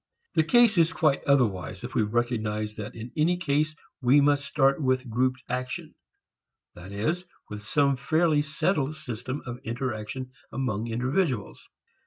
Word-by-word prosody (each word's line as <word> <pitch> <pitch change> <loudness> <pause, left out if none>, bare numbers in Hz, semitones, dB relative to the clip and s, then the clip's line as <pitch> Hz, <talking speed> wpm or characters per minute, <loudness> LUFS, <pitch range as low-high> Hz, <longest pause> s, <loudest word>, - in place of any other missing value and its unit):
The 160 - +4
case 230 +2 +5
is 165 +2 +4
quite 155 -4 +2
otherwise 110 -9 +1
if - - -6
we - - +2
recognize 110 -1 -1
that 105 0 -7
in 115 +1 -7
any 165 +3 +2
case 155 -2 0 0.3
we 130 +3 +5
must 145 0 +3
start 135 +1 +2
with 130 -1 +1
grouped 130 +2 0
action, 125 0 -4 0.8
that 90 +3 -11
is, 115 - -1 0.3
with 105 0 -6
some 140 +5 +2
fairly 155 +3 +2
settled 155 -1 0
system 130 -2 -5
of 120 0 -6
interaction 120 +1 -4 0.2
among 115 -4 -2
individuals. 125 - -1
130 Hz, 145 wpm, -27 LUFS, 115-150 Hz, 0.8 s, case